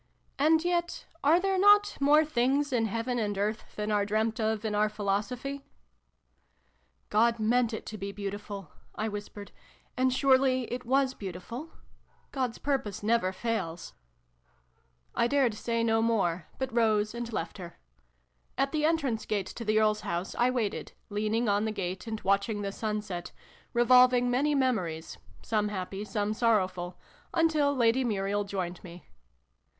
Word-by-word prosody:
And 320 Hz, +3 st, +4 dB
yet, 345 Hz, -1 st, -1 dB, 0.2 s
are 315 Hz, +5 st, +5 dB
there 385 Hz, 0 st, +1 dB
not 410 Hz, +1 st, +6 dB
' -, -, -22 dB
more 300 Hz, +3 st, +5 dB
things 275 Hz, +1 st, +1 dB
in 225 Hz, -2 st, +2 dB
heaven 230 Hz, +3 st, -2 dB
and 205 Hz, -2 st, -1 dB
earth 210 Hz, +2 st, -3 dB
than 210 Hz, 0 st, -2 dB
are 205 Hz, -1 st, +2 dB
dreamt 220 Hz, +2 st, 0 dB
of 220 Hz, 0 st, -1 dB
in 215 Hz, -, -1 dB
oiir 210 Hz, +1 st, +2 dB
philosophy 215 Hz, +7 st, -2 dB, 0.5 s
'? -, -, -44 dB
" -, -, -42 dB
God 230 Hz, +2 st, +3 dB
meant 235 Hz, +2 st, +2 dB
it 220 Hz, -, -5 dB
to 215 Hz, -, -7 dB
be 200 Hz, +1 st, -4 dB
beautiful," 200 Hz, -3 st, -6 dB, 0.2 s
I 215 Hz, -, -2 dB
whispered, 205 Hz, -1 st, -7 dB, 0.2 s
" -, -, -34 dB
and 255 Hz, 0 st, +2 dB
surely 260 Hz, -1 st, +3 dB
it 250 Hz, 0 st, -5 dB
was 265 Hz, 0 st, +2 dB
beautiful? 220 Hz, -, -7 dB, 0.6 s
God's 255 Hz, -4 st, -2 dB
purpose 265 Hz, -9 st, -2 dB
never 220 Hz, -3 st, +2 dB
fails! 190 Hz, -5 st, -3 dB, 0.6 s
" 60 Hz, -, -40 dB, 0.5 s
I 235 Hz, -, +3 dB
dared 265 Hz, -3 st, +2 dB
say 230 Hz, +2 st, -1 dB
no 225 Hz, -1 st, +2 dB
more, 195 Hz, -7 st, 0 dB
but 265 Hz, -2 st, -3 dB
rose 215 Hz, -2 st, +2 dB
and 235 Hz, 0 st, -5 dB
left 165 Hz, -3 st, -4 dB
her. 175 Hz, -2 st, -9 dB, 0.8 s
At 275 Hz, +1 st, +1 dB
the 310 Hz, -1 st, -1 dB
entrance 285 Hz, -9 st, 0 dB
gate 205 Hz, -3 st, -1 dB
to 230 Hz, -, -7 dB
the 215 Hz, -1 st, +2 dB
Earl's 215 Hz, -1 st, +2 dB
house 175 Hz, +2 st, -3 dB
I 245 Hz, +1 st, +2 dB
waited, 235 Hz, -5 st, -2 dB, 0.2 s
leaning 215 Hz, +3 st, 0 dB
on 205 Hz, +1 st, +2 dB
the 220 Hz, -, -1 dB
gate 190 Hz, -1 st, -4 dB
and 220 Hz, -1 st, -3 dB
watching 200 Hz, +2 st, +1 dB
the 200 Hz, -, -2 dB
sun 210 Hz, 0 st, -3 dB
set, 180 Hz, -4 st, -6 dB, 0.4 s
revolving 250 Hz, 0 st, +5 dB
many 290 Hz, +4 st, +2 dB
memories 185 Hz, -, -1 dB, 0.2 s
some 210 Hz, -2 st, 0 dB
happy, 195 Hz, 0 st, -4 dB
some 210 Hz, -1 st, -1 dB
sorrowful 185 Hz, -6 st, 0 dB, 0.4 s
until 305 Hz, -3 st, +3 dB
Lady 245 Hz, +1 st, +3 dB
Muriel 205 Hz, -2 st, -1 dB
joined 185 Hz, -3 st, -4 dB
me. 175 Hz, 0 st, -11 dB
220 Hz, 165 wpm, -29 LUFS, 205-255 Hz, 0.8 s, not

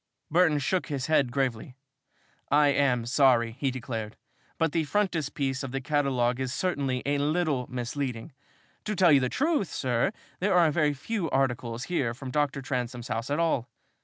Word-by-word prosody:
Burton 165 Hz, -2 st, +4 dB
shook 175 Hz, +6 st, 0 dB
his 140 Hz, -4 st, -3 dB
head 145 Hz, -5 st, +2 dB
gravely. 125 Hz, -2 st, -2 dB, 0.7 s
"I 145 Hz, +1 st, +5 dB
am 130 Hz, -4 st, +2 dB
sorry," 120 Hz, -2 st, +3 dB
he 140 Hz, -, +1 dB
declared, 115 Hz, -4 st, -5 dB, 0.4 s
"but 165 Hz, -2 st, +1 dB
the 165 Hz, 0 st, +1 dB
frontispiece 145 Hz, -7 st, -1 dB
of 135 Hz, -, -5 dB
the 135 Hz, -, -2 dB
catalogue 130 Hz, -3 st, 0 dB
is 130 Hz, -1 st, -2 dB
certainly 140 Hz, -7 st, -1 dB
a 145 Hz, 0 st, +1 dB
little 150 Hz, -3 st, 0 dB
misleading. 125 Hz, +1 st, -4 dB, 0.5 s
To 215 Hz, -, -2 dB
tell 180 Hz, -4 st, +5 dB
you 140 Hz, -, +7 dB
the 130 Hz, -1 st, 0 dB
truth, 290 Hz, -, 0 dB
sir, 125 Hz, +6 st, 0 dB, 0.3 s
there 190 Hz, 0 st, +1 dB
are 170 Hz, -3 st, +5 dB
very 150 Hz, -2 st, +1 dB
few 180 Hz, +4 st, -3 dB
articles 125 Hz, -3 st, -1 dB
here 130 Hz, -10 st, -1 dB
from 130 Hz, +1 st, -7 dB
Dr. 145 Hz, -1 st, 0 dB
Transome's 125 Hz, -2 st, -3 dB
house 115 Hz, +3 st, -3 dB
at 145 Hz, -, 0 dB
all. 160 Hz, -7 st, 0 dB
135 Hz, 165 wpm, -27 LUFS, 125-155 Hz, 0.7 s, you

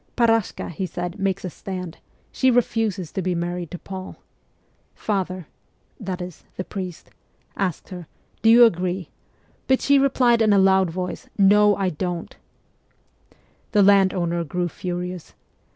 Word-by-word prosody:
'Parashka,' 225 Hz, -3 st, +1 dB
he 185 Hz, +3 st, -3 dB
said, 175 Hz, +3 st, -5 dB
'makes 195 Hz, 0 st, -1 dB
a -, -, -3 dB
stand; 180 Hz, -1 st, -7 dB, 0.3 s
she 260 Hz, -, +2 dB
refuses 220 Hz, -7 st, 0 dB
to 190 Hz, -, -3 dB
be 180 Hz, 0 st, -1 dB
married 175 Hz, 0 st, -3 dB
to 180 Hz, -, -6 dB
Paul. 190 Hz, +1 st, -8 dB, 0.8 s
Father 185 Hz, -4 st, -2 dB, 0.3 s
' -, -, -41 dB
(that 185 Hz, -1 st, -3 dB
is, 180 Hz, -2 st, -10 dB
the 185 Hz, -, -2 dB
priest) 185 Hz, -3 st, -6 dB
CHILDHOOD -, -, -29 dB, 0.3 s
61 195 Hz, -, -1 dB
asked 175 Hz, -, -8 dB
her, 180 Hz, -4 st, -8 dB, 0.2 s
" -, -, -39 dB
Do 225 Hz, -, +4 dB
you 240 Hz, +1 st, +9 dB
agree? 180 Hz, -3 st, -1 dB, 0.3 s
" -, -, -37 dB
but 265 Hz, 0 st, +3 dB
she 280 Hz, 0 st, +4 dB
replied 250 Hz, -4 st, +3 dB
in 215 Hz, -2 st, +4 dB
a -, -, +5 dB
loud 190 Hz, -1 st, +4 dB
voice, 180 Hz, +2 st, -5 dB
"No, 205 Hz, +1 st, +5 dB
I 195 Hz, -2 st, 0 dB
don't.'" 175 Hz, +2 st, -4 dB, 1.4 s
The 205 Hz, -2 st, +5 dB
landowner 190 Hz, -4 st, +3 dB
grew 175 Hz, +3 st, -2 dB
furious. 180 Hz, 0 st, -5 dB
185 Hz, 160 wpm, -23 LUFS, 180-205 Hz, 1.4 s, you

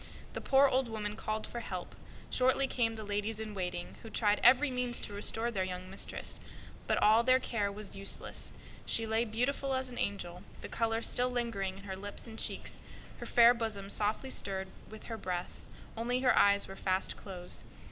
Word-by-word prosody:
The -, -, -4 dB
poor 275 Hz, +1 st, +6 dB
old 265 Hz, -1 st, +2 dB
woman 210 Hz, -2 st, -3 dB
called 215 Hz, 0 st, -2 dB
for 240 Hz, -, -5 dB
help; 185 Hz, -6 st, -5 dB, 0.4 s
shortly 260 Hz, +2 st, +3 dB
came 230 Hz, -4 st, 0 dB
the 220 Hz, -, -5 dB
ladies 210 Hz, +1 st, -2 dB
in 220 Hz, -1 st, -5 dB
waiting, 180 Hz, -2 st, -4 dB
who 225 Hz, -, -9 dB
tried 210 Hz, -2 st, +2 dB
every 265 Hz, +4 st, +7 dB
means 250 Hz, -1 st, 0 dB
to 205 Hz, -, -4 dB
restore 225 Hz, +3 st, 0 dB
their 195 Hz, -4 st, 0 dB
young 185 Hz, 0 st, -5 dB
mistress; 195 Hz, -, -2 dB, 0.5 s
but -, -, +2 dB
all 215 Hz, +2 st, +7 dB
in 255 Hz, +1 st, +5 dB
vain. 200 Hz, -4 st, -3 dB, 0.5 s
She 225 Hz, -, +2 dB
lay, 225 Hz, +1 st, +1 dB
beautiful 260 Hz, +4 st, 0 dB
as 260 Hz, 0 st, -1 dB
an 245 Hz, -, -6 dB
angel, 180 Hz, -3 st, -2 dB, 0.2 s
the -, -, -7 dB
color 225 Hz, 0 st, 0 dB
still 250 Hz, +1 st, +2 dB
lingering 230 Hz, -6 st, -2 dB
in 195 Hz, -, -11 dB
her 190 Hz, -1 st, -5 dB
lips 205 Hz, +2 st, -5 dB
and 225 Hz, -1 st, -8 dB
cheeks, -, -, -1 dB, 0.4 s
her -, -, -6 dB
fair 235 Hz, 0 st, +7 dB
bosom 215 Hz, -4 st, -2 dB
softly 220 Hz, +5 st, 0 dB
stirred 190 Hz, -4 st, -2 dB, 0.2 s
with 220 Hz, 0 st, -10 dB
her 225 Hz, -, -5 dB
breath; 180 Hz, -3 st, -4 dB, 0.3 s
only 245 Hz, +2 st, 0 dB
her 255 Hz, -1 st, +5 dB
eyes 200 Hz, 0 st, +5 dB
were 195 Hz, -, -8 dB
fast 190 Hz, -1 st, 0 dB
closed. 180 Hz, -3 st, -5 dB
220 Hz, 185 wpm, -33 LUFS, 200-240 Hz, 0.5 s, every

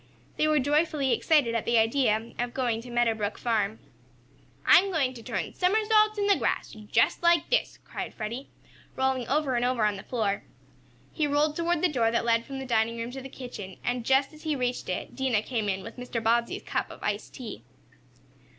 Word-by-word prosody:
They 305 Hz, -, +2 dB
were 305 Hz, 0 st, +3 dB
joyfully 295 Hz, 0 st, +2 dB
excited 290 Hz, -8 st, +3 dB
at 230 Hz, -, 0 dB
the 235 Hz, 0 st, +3 dB
idea 225 Hz, -1 st, +2 dB
of 240 Hz, 0 st, -2 dB
going 240 Hz, -4 st, 0 dB
to 245 Hz, -, -11 dB
Meadow 240 Hz, -1 st, +2 dB
Brook 210 Hz, -1 st, -3 dB
farm. 220 Hz, -3 st, 0 dB, 0.9 s
"I'm 395 Hz, +2 st, +6 dB
going 275 Hz, -7 st, +1 dB
to 240 Hz, -, -10 dB
turn -, -, -4 dB
somersaults 430 Hz, +3 st, +3 dB
in 405 Hz, -, +1 dB
the 400 Hz, -1 st, +4 dB
grass -, -, -1 dB
just 215 Hz, -1 st, +1 dB
like 340 Hz, +1 st, +3 dB
this," -, -, +1 dB
cried -, -, -5 dB
Freddie, 235 Hz, +5 st, -5 dB, 0.5 s
rolling 265 Hz, -2 st, 0 dB
over 285 Hz, -1 st, +1 dB
and 240 Hz, -, +1 dB
over 245 Hz, -3 st, +2 dB
on 210 Hz, -1 st, +1 dB
the 195 Hz, -, -9 dB
floor. 215 Hz, -5 st, -1 dB, 0.7 s
He 305 Hz, -2 st, +1 dB
rolled 295 Hz, +1 st, +2 dB
toward 340 Hz, 0 st, 0 dB
the -, -, +6 dB
door 245 Hz, -8 st, +1 dB
that 230 Hz, 0 st, 0 dB
led 230 Hz, 0 st, +2 dB
from 275 Hz, -, -6 dB
the 265 Hz, -, -5 dB
dining 230 Hz, -1 st, +1 dB
room 230 Hz, +1 st, -4 dB
to 265 Hz, +1 st, -7 dB
the 270 Hz, -, -8 dB
kitchen, 210 Hz, -8 st, -8 dB
and, 245 Hz, -1 st, -1 dB
just 270 Hz, +4 st, +2 dB
as 305 Hz, -, -14 dB
he 310 Hz, -2 st, -1 dB
reached 250 Hz, -5 st, -2 dB
it, 185 Hz, -, -4 dB
Dinah 250 Hz, -5 st, +1 dB
came 220 Hz, -3 st, -2 dB
in 190 Hz, 0 st, -2 dB
with -, -, -9 dB
Mr. 250 Hz, -1 st, -4 dB
Bobbsey's 235 Hz, +1 st, +1 dB
cup -, -, -2 dB
of -, -, -11 dB
iced 205 Hz, 0 st, -3 dB
tea. 240 Hz, -4 st, -7 dB
250 Hz, 205 wpm, -27 LUFS, 225-295 Hz, 0.9 s, I'm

